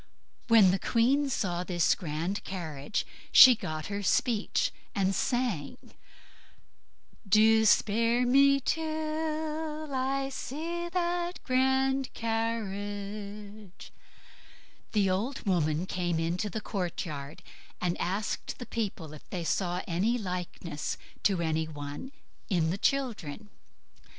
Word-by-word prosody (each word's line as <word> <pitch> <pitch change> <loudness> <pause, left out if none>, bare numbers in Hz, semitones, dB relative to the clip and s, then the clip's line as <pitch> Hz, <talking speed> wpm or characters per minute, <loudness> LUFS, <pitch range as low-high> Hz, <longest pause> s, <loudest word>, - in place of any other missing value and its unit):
When 220 -6 +7
the 190 - 0
queen 270 +7 +2
saw 180 -8 -1
this 175 -3 +2
grand 170 +3 -3
carriage 160 -3 -4 0.3
she 255 - +10
got 155 -8 -5
her 200 +1 -3
speech 215 +2 +1 0.2
and 195 -1 +2
sung, 230 - -1 1.5
"Do 220 +2 +6
spare 230 +4 +3
me 275 +2 +5
till 310 0 -2
I 270 +1 0
see 330 +6 -4
that 350 0 -1
grand 265 +1 +2
carriage." 205 -2 -4 1.0
The 205 -3 +3
old 215 +10 -1
woman 165 -3 +1
came 175 -3 -1
into 175 +5 -1
the 220 - -4
courtyard, 165 -7 -4 0.4
and 180 -1 0
asked 195 +4 -2
the 245 - -7
people 195 -10 -4
if 155 - -13
they 180 -3 -3
saw 180 +1 -1
any 195 +8 +1
likeness 180 -6 -4 0.2
to 190 -4 +2
any 160 -1 0
one 145 - -7 0.4
in 165 -5 +2
the 185 - -2
children. 220 - -1
210 Hz, 110 wpm, -29 LUFS, 175-260 Hz, 1.5 s, she